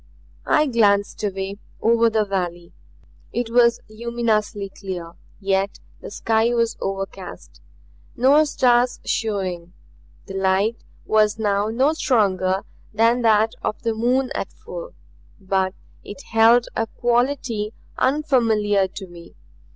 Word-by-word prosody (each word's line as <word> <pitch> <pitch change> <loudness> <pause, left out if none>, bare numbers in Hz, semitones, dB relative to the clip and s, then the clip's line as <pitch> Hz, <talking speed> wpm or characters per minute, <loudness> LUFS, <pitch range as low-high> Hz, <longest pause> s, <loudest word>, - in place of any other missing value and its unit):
I 305 - +4
glanced 210 -7 +2
away; 195 0 -3 0.2
over 230 0 +3
the 220 -1 +1
valley. 175 -3 -4 0.6
It 235 0 -3
was 235 0 +4
luminously 215 -3 -2
clear; 185 -4 -7 0.3
yet 195 0 -1 0.2
the - - -8
sky 225 +3 +1
was 230 -1 +1
overcast, 190 - -6 0.5
no 280 +5 +5
stars 245 -3 +2
showing. 185 -5 -2 0.5
The 195 - -9
light 195 +4 +1 0.3
was 215 -1 +2
no 220 +7 +1
stronger 195 - +1 0.3
than 230 +3 +3
that 220 -1 +4
of 215 - -3
the 230 -1 0
moon 250 +4 +1
at - - -4
full, 175 - -9 0.4
but 190 0 -1 0.3
it 195 -2 -10
held 230 +2 +5
a 225 - 0
quality 240 -3 0 0.2
unfamiliar 230 -8 +2
to 190 +1 -9
me. 175 -2 -14
215 Hz, 115 wpm, -22 LUFS, 195-235 Hz, 0.6 s, no